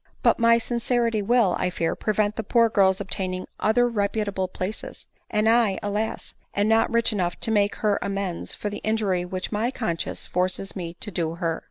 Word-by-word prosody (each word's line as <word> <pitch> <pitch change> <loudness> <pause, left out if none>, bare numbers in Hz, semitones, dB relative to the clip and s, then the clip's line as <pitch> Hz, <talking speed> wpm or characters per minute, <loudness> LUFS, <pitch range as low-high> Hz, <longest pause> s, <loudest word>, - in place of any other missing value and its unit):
" - - -34
But - - +4
my 230 0 +5
sincerity 235 -1 0
will, 225 -2 +3
I 180 - +1
fear, 170 -2 -1
prevent 215 0 0
the - - -2
poor 230 +2 +3
girl's 195 -3 +3
obtaining 185 -2 -2
other 245 +3 +3
reputable 200 -3 -1
places; 185 +3 -5 0.2
and 210 +1 +1
I, 225 -4 +4
alas! 210 +2 -2 0.2
am 205 +1 +2
not 225 +1 +3
rich 235 -1 +2
enough 180 -4 -1
to 225 - +2
make 205 -2 +2
her 210 -2 +1
amends 195 -3 -3
for 210 - -4
the 205 - -5
injury 205 -5 0
which 185 +1 -4
my 220 +3 0
conscience 220 -10 -3
forces 185 +2 -1
me 170 -3 -5
to 210 - -4
do 165 -2 -1
her. 165 -2 -2
205 Hz, 190 wpm, -25 LUFS, 185-225 Hz, 0.2 s, my